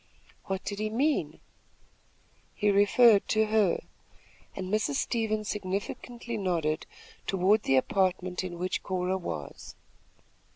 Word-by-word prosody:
"What 190 Hz, -1 st, -3 dB
did 200 Hz, 0 st, -4 dB
he 215 Hz, 0 st, -1 dB
mean?" 280 Hz, +8 st, 0 dB, 1.2 s
"He 210 Hz, -2 st, +2 dB
referred 205 Hz, +2 st, +5 dB
to 220 Hz, 0 st, +2 dB
her," 215 Hz, -4 st, +2 dB, 0.7 s
and 190 Hz, +1 st, -5 dB
Mrs. 215 Hz, -10 st, +1 dB
Stevens 215 Hz, -, -1 dB
significantly 210 Hz, +4 st, -4 dB
nodded 165 Hz, -6 st, -1 dB, 0.4 s
toward 195 Hz, +3 st, +3 dB
the 135 Hz, -, +2 dB
apartment 185 Hz, +5 st, +1 dB
in 175 Hz, -2 st, -5 dB
which 180 Hz, +2 st, -2 dB
Cora 185 Hz, 0 st, -1 dB
was. 80 Hz, -, -6 dB
195 Hz, 115 wpm, -29 LUFS, 185-215 Hz, 1.2 s, referred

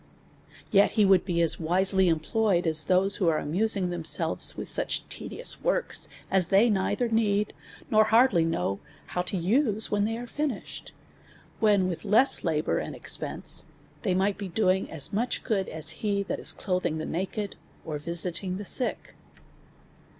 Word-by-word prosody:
Yet 200 Hz, -1 st, +4 dB
he 215 Hz, -3 st, +3 dB
would 190 Hz, -2 st, +4 dB
be 170 Hz, -3 st, +1 dB
as 165 Hz, -, +1 dB
wisely 185 Hz, +3 st, +2 dB
employed, 175 Hz, +3 st, +1 dB
as 160 Hz, -2 st, +1 dB
those 190 Hz, +3 st, +2 dB
that 185 Hz, -, +1 dB
are 160 Hz, -2 st, +3 dB
amusing 185 Hz, +4 st, 0 dB
themselves 165 Hz, -2 st, +2 dB
with -, -, -5 dB
such -, -, -1 dB
tedious -, -, -1 dB
works -, -, 0 dB, 0.2 s
as 190 Hz, -3 st, +3 dB
they 205 Hz, +5 st, +4 dB
neither 205 Hz, +5 st, 0 dB
need, 210 Hz, -2 st, 0 dB, 0.4 s
nor 215 Hz, 0 st, +5 dB
hardly 220 Hz, -5 st, +4 dB
know 100 Hz, -, -1 dB, 0.3 s
how 180 Hz, -, -3 dB
to 185 Hz, +2 st, -3 dB
use 220 Hz, -, +1 dB
them -, -, -18 dB
when 205 Hz, -1 st, +1 dB
they 225 Hz, +1 st, -2 dB
are 240 Hz, -, -6 dB
finished; 290 Hz, +3 st, -5 dB, 0.7 s
when 205 Hz, -4 st, +3 dB
with 175 Hz, -3 st, -5 dB
less 215 Hz, +6 st, +3 dB
labour 160 Hz, -3 st, 0 dB
and -, -, -6 dB
expense -, -, -1 dB, 0.4 s
they 190 Hz, -5 st, 0 dB
might 195 Hz, +2 st, 0 dB
be 200 Hz, -, -4 dB
doing 185 Hz, 0 st, 0 dB
as 150 Hz, 0 st, -3 dB
much 235 Hz, +4 st, -1 dB
good, 200 Hz, -5 st, -1 dB
as 160 Hz, 0 st, -4 dB
he 200 Hz, -2 st, 0 dB
that -, -, -4 dB
is -, -, 0 dB
clothing 180 Hz, -5 st, -2 dB
the 155 Hz, -, -4 dB
naked, 195 Hz, +4 st, -4 dB, 0.3 s
or 150 Hz, -2 st, -4 dB
visiting 175 Hz, +3 st, -1 dB
the 205 Hz, -, -7 dB
sick. 250 Hz, +5 st, -2 dB
195 Hz, 165 wpm, -27 LUFS, 170-215 Hz, 0.7 s, nor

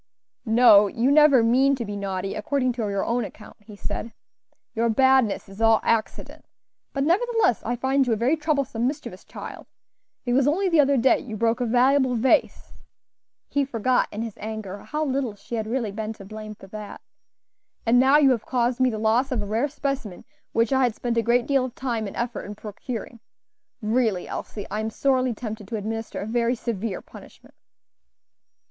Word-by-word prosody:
"No, 220 Hz, -3 st, +7 dB
you 235 Hz, +7 st, +1 dB
never 290 Hz, -5 st, +6 dB
mean 265 Hz, +4 st, +4 dB
to 240 Hz, -3 st, -4 dB
be 205 Hz, 0 st, -5 dB
naughty, 195 Hz, -1 st, -3 dB
according 255 Hz, +4 st, 0 dB
to 225 Hz, -3 st, -3 dB
your 200 Hz, -1 st, -1 dB
own 240 Hz, +1 st, 0 dB
account," 210 Hz, 0 st, -11 dB
he 210 Hz, 0 st, -13 dB
said; 220 Hz, +2 st, -5 dB, 0.6 s
"your 230 Hz, 0 st, +1 dB
badness 260 Hz, -2 st, +3 dB
is 195 Hz, +3 st, -10 dB
all 225 Hz, -1 st, +5 dB
accident; 225 Hz, -2 st, -2 dB, 0.5 s
but 275 Hz, -, -1 dB
nevertheless, 430 Hz, -, +2 dB
I 240 Hz, -, -1 dB
find 265 Hz, +2 st, +1 dB
you 235 Hz, -, +2 dB
a -, -, +2 dB
very 240 Hz, +8 st, +2 dB
troublesome, 280 Hz, -6 st, -1 dB
mischievous 280 Hz, +2 st, -6 dB
child; -, -, -9 dB, 0.6 s
it 245 Hz, -, 0 dB
was 270 Hz, +1 st, +3 dB
only 370 Hz, +6 st, +2 dB
the 330 Hz, -3 st, +3 dB
other 280 Hz, -1 st, +4 dB
day 260 Hz, +2 st, +4 dB
you 220 Hz, -3 st, -7 dB
broke 230 Hz, +2 st, +1 dB
a 245 Hz, -, 0 dB
valuable 255 Hz, +2 st, +3 dB
vase" 245 Hz, +3 st, +1 dB, 0.7 s
(he 285 Hz, -, 0 dB
forgot 255 Hz, -1 st, +1 dB
in 215 Hz, +2 st, -4 dB
his 225 Hz, -2 st, -5 dB
anger 215 Hz, -2 st, -6 dB
how 305 Hz, +8 st, -3 dB
little 260 Hz, -5 st, -2 dB
she 205 Hz, +4 st, -12 dB
had 220 Hz, -2 st, -2 dB
really 230 Hz, -2 st, -2 dB
been 215 Hz, +1 st, -4 dB
to 200 Hz, -, -13 dB
blame 215 Hz, +1 st, -8 dB
for 195 Hz, -, -14 dB
that), 210 Hz, +1 st, -9 dB, 0.8 s
"and 240 Hz, +2 st, +4 dB
now 265 Hz, +3 st, +6 dB
you 280 Hz, -3 st, +5 dB
have 230 Hz, -4 st, 0 dB
caused 245 Hz, -1 st, 0 dB
me 255 Hz, 0 st, +4 dB
the 220 Hz, -, -4 dB
loss 225 Hz, +5 st, +1 dB
of 235 Hz, -5 st, -1 dB
a -, -, -5 dB
rare 225 Hz, +7 st, 0 dB
specimen 275 Hz, -9 st, -4 dB, 0.3 s
which 230 Hz, +3 st, +1 dB
I 265 Hz, -, +3 dB
had 245 Hz, -4 st, +1 dB
spent 240 Hz, -1 st, -2 dB
a -, -, +4 dB
great 235 Hz, +2 st, +2 dB
deal 275 Hz, -2 st, +2 dB
of 255 Hz, -, -8 dB
time 235 Hz, -5 st, -2 dB
and 195 Hz, -, -8 dB
effort 235 Hz, -1 st, -3 dB
in 205 Hz, -, -7 dB
procuring. 225 Hz, +3 st, -7 dB, 0.6 s
Really, 220 Hz, -4 st, 0 dB
Elsie, 205 Hz, -, -6 dB
I 210 Hz, -, -2 dB
am 220 Hz, 0 st, -2 dB
sorely 255 Hz, 0 st, +1 dB
tempted 215 Hz, -3 st, -7 dB
to 225 Hz, -, -4 dB
administer 225 Hz, +1 st, -4 dB
a -, -, -4 dB
very 235 Hz, +2 st, 0 dB
severe 225 Hz, -4 st, -4 dB
punishment." -, -, -15 dB
235 Hz, 190 wpm, -24 LUFS, 215-265 Hz, 0.8 s, No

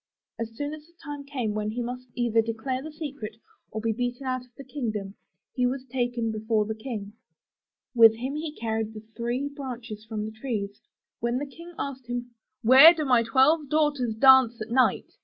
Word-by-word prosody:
As 230 Hz, -1 st, -3 dB
soon 290 Hz, +4 st, -3 dB
as 305 Hz, 0 st, -10 dB
the 340 Hz, -, -26 dB
time 290 Hz, -2 st, -6 dB
came 255 Hz, -7 st, -2 dB
when 210 Hz, 0 st, -2 dB
he 240 Hz, +3 st, -3 dB
must 250 Hz, +1 st, -6 dB
either 235 Hz, -2 st, +2 dB
declare 230 Hz, +4 st, -3 dB
the 315 Hz, +3 st, -7 dB
secret, 280 Hz, -8 st, -6 dB, 0.3 s
or 220 Hz, -, -4 dB
be 225 Hz, 0 st, 0 dB
beaten 245 Hz, +3 st, -3 dB
out 255 Hz, -1 st, -2 dB
of 250 Hz, -1 st, -24 dB
the 275 Hz, -, -8 dB
kingdom, 220 Hz, -8 st, -4 dB, 0.4 s
he 250 Hz, -1 st, +2 dB
was 260 Hz, +1 st, -3 dB
taken 240 Hz, -2 st, -1 dB
before 220 Hz, 0 st, 0 dB
the 220 Hz, -, -3 dB
King. 220 Hz, -3 st, -6 dB, 0.8 s
With 225 Hz, -2 st, +7 dB
him 260 Hz, +5 st, -4 dB
he 305 Hz, 0 st, -4 dB
carried 220 Hz, -1 st, -3 dB
the 215 Hz, -, -7 dB
three 240 Hz, +4 st, -2 dB
branches 250 Hz, -6 st, -7 dB
from 215 Hz, -1 st, -4 dB
the 220 Hz, -, -5 dB
trees. 220 Hz, -3 st, -4 dB, 0.4 s
When 235 Hz, +1 st, 0 dB
the 285 Hz, -, -2 dB
King 335 Hz, +5 st, -12 dB
asked 265 Hz, -3 st, -5 dB
him, 245 Hz, 0 st, -4 dB, 0.2 s
* 260 Hz, -, -57 dB
'Where 270 Hz, +9 st, +9 dB
do 310 Hz, -2 st, -2 dB
my 250 Hz, -3 st, +4 dB
twelve 270 Hz, +6 st, +3 dB
daughters 290 Hz, -7 st, +1 dB
dance 260 Hz, -1 st, +6 dB
at 215 Hz, +1 st, -6 dB
night?' 255 Hz, +1 st, +2 dB
245 Hz, 195 wpm, -26 LUFS, 225-275 Hz, 0.8 s, Where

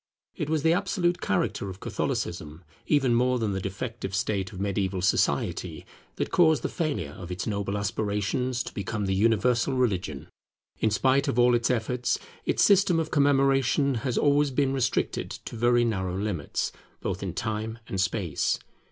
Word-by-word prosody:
It 155 Hz, -5 st, -3 dB
was 155 Hz, -2 st, 0 dB
the 165 Hz, 0 st, +4 dB
absolute 180 Hz, -2 st, 0 dB
character 100 Hz, +1 st, -1 dB
of 95 Hz, +1 st, -8 dB
Catholicism, 80 Hz, -3 st, -3 dB, 0.2 s
even 135 Hz, -5 st, +3 dB
more 125 Hz, +2 st, +3 dB
than 110 Hz, -3 st, -1 dB
the 95 Hz, -1 st, -2 dB
defective 100 Hz, +1 st, -4 dB
state 95 Hz, 0 st, -1 dB
of 95 Hz, -, -9 dB
mediaeval 95 Hz, -2 st, -1 dB
society, 95 Hz, -, 0 dB, 0.3 s
that -, -, -3 dB
caused 160 Hz, -3 st, +4 dB
the -, -, -1 dB
failure 140 Hz, -, -2 dB
of 85 Hz, +3 st, -9 dB
its 90 Hz, 0 st, -3 dB
noble 100 Hz, -1 st, -2 dB
aspirations 105 Hz, +5 st, -1 dB
to -, -, -8 dB
become 100 Hz, +1 st, -3 dB
the 95 Hz, -, 0 dB
universal 115 Hz, +5 st, +2 dB
religion. 95 Hz, -, -1 dB, 0.5 s
In 110 Hz, -, +2 dB
spite 130 Hz, +5 st, +2 dB
of -, -, -1 dB
all 125 Hz, 0 st, +5 dB
its 120 Hz, -1 st, +2 dB
efforts, 125 Hz, 0 st, 0 dB, 0.3 s
its -, -, +3 dB
system 195 Hz, -4 st, +5 dB
of 160 Hz, -1 st, -2 dB
commemoration 140 Hz, -1 st, +3 dB
has 125 Hz, -1 st, -1 dB
always 145 Hz, 0 st, +3 dB
been 135 Hz, 0 st, +1 dB
restricted 130 Hz, -3 st, 0 dB, 0.2 s
to -, -, -7 dB
very 120 Hz, +1 st, +3 dB
narrow 95 Hz, -5 st, -1 dB
limits, 95 Hz, -7 st, -2 dB, 0.3 s
both -, -, -3 dB
in -, -, -4 dB
time 110 Hz, +1 st, -3 dB
and 95 Hz, -, -1 dB
space. 95 Hz, -6 st, 0 dB
115 Hz, 165 wpm, -27 LUFS, 100-135 Hz, 0.5 s, all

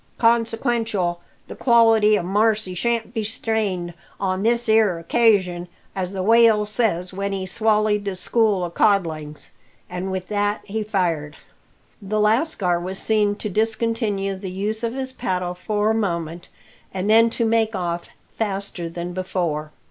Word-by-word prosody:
Consequential, 225 Hz, -6 st, +1 dB, 0.3 s
the -, -, -8 dB
quality 225 Hz, -3 st, +4 dB
o' -, -, -2 dB
marcy 210 Hz, +1 st, +1 dB
shan't 230 Hz, +4 st, -1 dB
be 225 Hz, -3 st, -2 dB
strained 205 Hz, -5 st, -2 dB, 0.3 s
on 190 Hz, -1 st, -1 dB
this 235 Hz, +2 st, +1 dB
'ere 220 Hz, -5 st, +4 dB
occasion, 180 Hz, -1 st, +2 dB, 0.3 s
as 185 Hz, -1 st, -2 dB
the 190 Hz, -2 st, -3 dB
whale 225 Hz, 0 st, +5 dB
says 205 Hz, -5 st, -1 dB
when 200 Hz, +1 st, -3 dB
he 190 Hz, -1 st, -3 dB
swallied 215 Hz, +1 st, +1 dB
the 195 Hz, -2 st, -2 dB
school 205 Hz, 0 st, +1 dB
o' 175 Hz, -, -3 dB
codlings." 160 Hz, -7 st, 0 dB, 0.4 s
And 180 Hz, +1 st, -4 dB
with 185 Hz, -1 st, -4 dB
that 205 Hz, 0 st, 0 dB
he 220 Hz, +1 st, -3 dB
fired. 170 Hz, -8 st, -1 dB, 0.7 s
The 210 Hz, +2 st, -2 dB
lascar 210 Hz, -, +1 dB
was 185 Hz, +2 st, -5 dB
seen 210 Hz, -1 st, +1 dB
to 215 Hz, -, -5 dB
discontinue 220 Hz, -1 st, -1 dB
the 190 Hz, 0 st, -6 dB
use 210 Hz, +4 st, -3 dB
of 230 Hz, +1 st, -2 dB
his 260 Hz, -1 st, -4 dB
paddle 180 Hz, -7 st, -2 dB
for 210 Hz, +4 st, 0 dB
a -, -, +2 dB
moment, 170 Hz, -5 st, -3 dB, 0.4 s
and 190 Hz, +1 st, -3 dB
then 225 Hz, +2 st, +6 dB
to 230 Hz, -, +1 dB
make 225 Hz, -1 st, +1 dB
off 175 Hz, -2 st, -3 dB, 0.3 s
faster 195 Hz, -5 st, -3 dB
than 175 Hz, +1 st, -5 dB
before. 170 Hz, -5 st, -2 dB
205 Hz, 150 wpm, -22 LUFS, 180-225 Hz, 0.7 s, then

